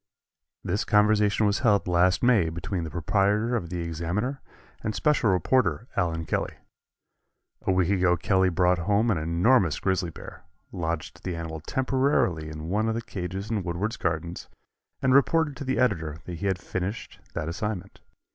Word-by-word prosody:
This 100 +4 -1
conversation 105 0 +3
was 100 0 +2
held 105 -7 +2
last 90 +3 +3
May 115 -9 +4
between 85 +2 -4
the - - -5
proprietor 100 - +1
of 85 -8 -3
the 90 0 -3
Examiner 85 - -3 0.4
and 110 - -3
special 150 -7 +2
reporter 95 - +1
Allen 85 -3 0
Kelly. - - -2 1.1
A - - +4
week 95 0 +2
ago 90 -2 +3
Kelly 95 +2 +2
brought 90 +1 +2
home 105 +6 +2
an 95 - +1
enormous 85 - +2
grizzly 95 -2 0
bear, 80 - -11 0.3
lodged 85 -2 -4
the 90 - -3
animal 80 -1 -5
temporarily 130 - 0
in 75 +1 -7
one 110 +4 +1
of 110 - -1
the 115 - -2
cages 95 0 -5
in 110 -3 0
Woodward's 90 +6 -3
Gardens 85 0 -3 0.5
and 130 - +4
reported 145 +2 +3
to 145 - -5
the 130 -1 -1
editor 80 -11 0
that 90 - -6
he 100 - -1
had 95 -1 +1
finished 90 +4 -5 0.2
that 75 - -2
assignment. 100 +2 -4
95 Hz, 165 wpm, -26 LUFS, 85-110 Hz, 1.1 s, May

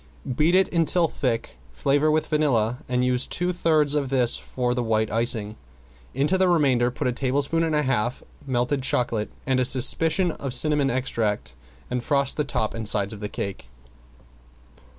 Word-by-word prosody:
Beat 160 +6 +2
it 190 0 +4
until 165 +1 +2
thick, 115 - -3
flavor 145 - +1
with 155 0 +1
vanilla, 125 -6 0
and 125 0 +1
use 125 0 0
two 180 +1 -1
thirds 155 -4 +2
of 145 -3 -1
this 125 -3 +2
for 125 -1 -2
the 125 - -1
white 110 -2 0
icing. 110 -1 0 0.6
Into 150 +8 +1
the 185 -1 +3
remainder 135 -8 +2
put 125 - -5
a - - +1
tablespoon 140 +6 0
and 160 -2 0
a 150 - +1
half 125 -2 -1 0.2
melted 130 +2 0
chocolate 120 -4 -1 0.2
and 130 -3 +1
a - - +3
suspicion 160 +8 +3
of 135 -4 -2
cinnamon 145 +1 +3
extract, 115 -5 -2 0.4
and 125 -1 -2
frost 140 -1 +1
the 150 - 0
top 110 -6 -2
and 115 -2 -4
sides 100 -1 0
of 105 - -9
the 105 0 -5
cake. 100 -12 -6
130 Hz, 170 wpm, -24 LUFS, 120-150 Hz, 0.6 s, it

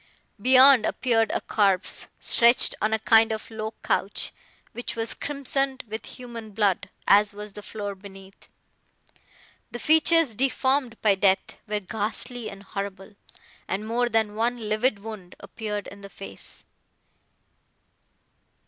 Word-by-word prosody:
Beyond, 260 0 +7
appeared 225 -3 +1
a - - -1
corpse, 195 -3 +1
stretched 235 +1 +4
on 215 - +1
a 220 - +2
kind 225 0 +4
of 220 +1 -5
low 220 0 -5
couch, - - 0 0.4
which 240 - -5
was 225 0 -1
crimsoned 275 -2 -2
with 220 +1 -6
human 235 -4 -9
blood, 200 -3 0 0.2
as 205 0 +5
was 210 0 -8
the 210 - -9
floor 205 0 -6
beneath. 195 0 -14 1.2
The 240 - -6
features, 320 -1 +3
deformed 260 0 0
by 210 -2 +5
death, 190 0 +1
were 210 0 -1
ghastly 220 +4 -1
and 195 0 -11
horrible, 200 +1 -6 0.5
and 205 +3 -3
more 240 +2 0
than 220 -2 +1
one 235 +3 0
livid 215 +2 +1
wound 200 -4 -10
appeared 210 -3 -5
in 200 +1 -11
the 200 - -10
face. 195 - -12
220 Hz, 130 wpm, -25 LUFS, 205-240 Hz, 1.2 s, Beyond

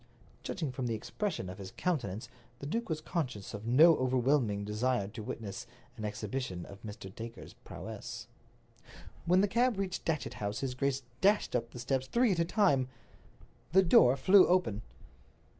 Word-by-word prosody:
Judging 155 -6 -3
from 125 -1 -3
the 115 - -1
expression 155 - -3
of 90 +1 -8
his 95 -1 -7
countenance, 120 - -2 0.3
the 140 - -8
duke 230 +10 -2
was 155 -1 -2
conscious 130 - -3
of 105 +2 -6
no 155 +7 +7
overwhelming 125 -5 +1
desire 105 0 0
to 110 +2 -8
witness 105 0 -6 0.3
an 110 - -8
exhibition 105 -3 -4
of 100 0 -12
Mr. 105 -3 -8
Dacre's 115 0 -9
prowess. - - -8 1.0
When 180 +2 +5
the 205 - +3
cab 235 +2 +2
reached 190 -2 -3
Datchet 155 -3 -2
House 100 0 -2
his 135 -2 -2
grace 135 +1 -1 0.2
dashed 205 -6 +3
up 115 -1 -1
the - - -11
steps 130 +2 -1
three 240 - +3
at 175 - 0
a 170 - +3
time. 165 - +3 0.9
The 190 +1 +7
door 135 -7 +6
flew 190 +6 +6
open. 175 - +2
130 Hz, 165 wpm, -32 LUFS, 110-170 Hz, 1.0 s, no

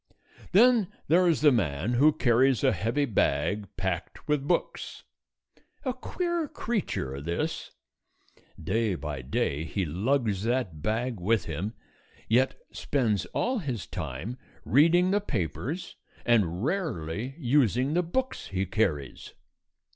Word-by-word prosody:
Then 225 0 +5 0.2
there 180 +3 +5
is 165 -4 +2
the 150 -1 +7
man 95 - 0
who 145 +6 +5
carries 130 -3 +3
a - - +5
heavy 120 +7 0
bag 100 - 0
packed 90 -3 -3
with 150 -2 0
books. 175 - -2 0.8
A 255 - 0
queer 345 +5 -2
creature, 70 - -3
this. 85 +3 -3 0.9
Day 105 +4 0
by 75 -3 -5
day 70 +3 -1
he 95 +4 -2
lugs 105 - 0
that 115 -9 -1
bag 115 +3 -1
with 105 +2 +1
him 90 +8 -4 0.5
yet 125 +4 +3 0.2
spends 115 -8 0
all 250 0 -1
his 130 - -4
time 85 - -5 0.3
reading 170 +7 +4
the 205 +1 +2
papers 145 - -3 0.3
and 100 -6 +2
rarely 130 - -2
using 130 - +2
the 175 - +3
books 260 +10 -2
he 95 0 -1
carries. 90 - -2
120 Hz, 125 wpm, -28 LUFS, 90-155 Hz, 0.9 s, the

